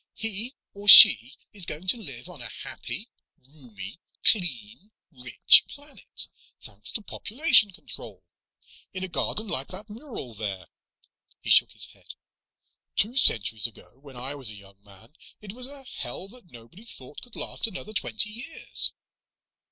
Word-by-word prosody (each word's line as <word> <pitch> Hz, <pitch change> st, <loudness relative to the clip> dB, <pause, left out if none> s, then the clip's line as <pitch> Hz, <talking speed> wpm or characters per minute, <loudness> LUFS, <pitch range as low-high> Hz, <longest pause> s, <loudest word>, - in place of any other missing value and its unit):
"He 225 Hz, +4 st, -5 dB, 0.2 s
or 200 Hz, +1 st, -12 dB
she 120 Hz, -, +9 dB, 0.2 s
is 195 Hz, -5 st, -6 dB
going 160 Hz, +5 st, -6 dB
to -, -, +7 dB
live 145 Hz, -, -8 dB
on -, -, -11 dB
a -, -, -6 dB
happy, -, -, -8 dB, 0.4 s
roomy, 120 Hz, -, -12 dB, 0.3 s
clean, 170 Hz, -, -1 dB, 0.2 s
rich 125 Hz, -4 st, +5 dB
planet, -, -, -3 dB, 0.3 s
thanks 105 Hz, -1 st, -3 dB
to 215 Hz, -, -4 dB
population 230 Hz, -, +2 dB
control. 185 Hz, -, -10 dB, 0.7 s
In 185 Hz, 0 st, -5 dB
a -, -, -3 dB
garden 180 Hz, +6 st, -3 dB
like 135 Hz, -8 st, -1 dB
that 205 Hz, +3 st, -9 dB
mural 225 Hz, -, -9 dB
there." 100 Hz, -5 st, -6 dB, 0.7 s
He -, -, -4 dB
shook -, -, +4 dB
his -, -, +1 dB
head. -, -, -14 dB, 0.8 s
"Two 225 Hz, +5 st, -1 dB
centuries 110 Hz, -, +4 dB
ago, 120 Hz, +2 st, -17 dB
when 135 Hz, -2 st, -15 dB
I 130 Hz, +3 st, -5 dB
was 135 Hz, -6 st, -3 dB
a 105 Hz, -, -4 dB
young 100 Hz, 0 st, -18 dB
man, 105 Hz, +6 st, -13 dB, 0.3 s
it 205 Hz, -2 st, -10 dB
was 250 Hz, +2 st, -2 dB
a 280 Hz, 0 st, -7 dB
hell 185 Hz, -, -5 dB
that 240 Hz, -5 st, -14 dB
nobody 120 Hz, -, -16 dB
thought 145 Hz, -, -10 dB
could 245 Hz, -, -14 dB
last -, -, -2 dB
another 215 Hz, +1 st, -8 dB
twenty 215 Hz, +1 st, 0 dB
years. 240 Hz, +9 st, +1 dB
165 Hz, 150 wpm, -25 LUFS, -, 0.8 s, she